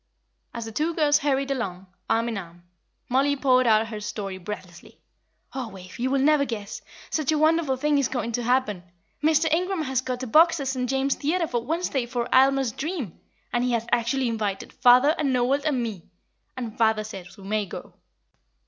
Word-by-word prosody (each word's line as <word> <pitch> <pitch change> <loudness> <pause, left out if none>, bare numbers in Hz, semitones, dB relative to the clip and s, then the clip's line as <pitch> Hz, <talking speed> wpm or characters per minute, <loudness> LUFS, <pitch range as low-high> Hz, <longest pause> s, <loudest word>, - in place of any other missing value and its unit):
As 235 -1 -6
the 225 - -7
two 315 +8 -1
girls 295 -2 +3
hurried 275 -2 0
along, 195 -8 -3 0.2
arm 230 +1 +2
in 235 - -2
arm, 175 -3 -8 0.4
Mollie 275 +3 +2
poured 255 -2 +3
out 220 0 +3
her 215 -2 -5
story 200 -3 -5
breathlessly. 180 -2 -9 0.5
"Oh, 260 -3 -4
Wave, 190 +5 -12
you 255 +2 0
will 275 - +2
never 290 +1 +4
guess; 220 -6 -5 0.3
such 310 -2 0
a 310 - +2
wonderful 310 -3 +2
thing 295 +1 +2
is 275 - +2
going 245 -3 -3
to 245 - -1
happen! 240 -6 +1 0.4
Mr. 315 +1 +3
Ingram 365 0 0
has 265 -3 0
got 255 0 -4
a - - -2
box 325 +6 +5
at 275 -2 -2
St. 255 -2 -2
James's 270 +1 0
Theatre 335 +4 +1
for 240 -6 -2
Wednesday 300 -5 -1
for 240 -1 -2
Aylmer's 270 -1 +4
Dream, 285 - -5 0.3
and 240 0 +1
he 250 -1 0
has 230 -1 0
actually 240 +2 +1
invited 210 -4 -3
father, 250 +4 +5
and 280 -3 +1
Noel, 255 +3 +2
and 280 -6 0
me; 205 -8 -6 0.5
and 235 -4 -5
father 220 -1 +2
says 195 -3 -10
we 195 - -13
may 210 +1 -1
go." - - -9
255 Hz, 195 wpm, -25 LUFS, 220-280 Hz, 0.5 s, box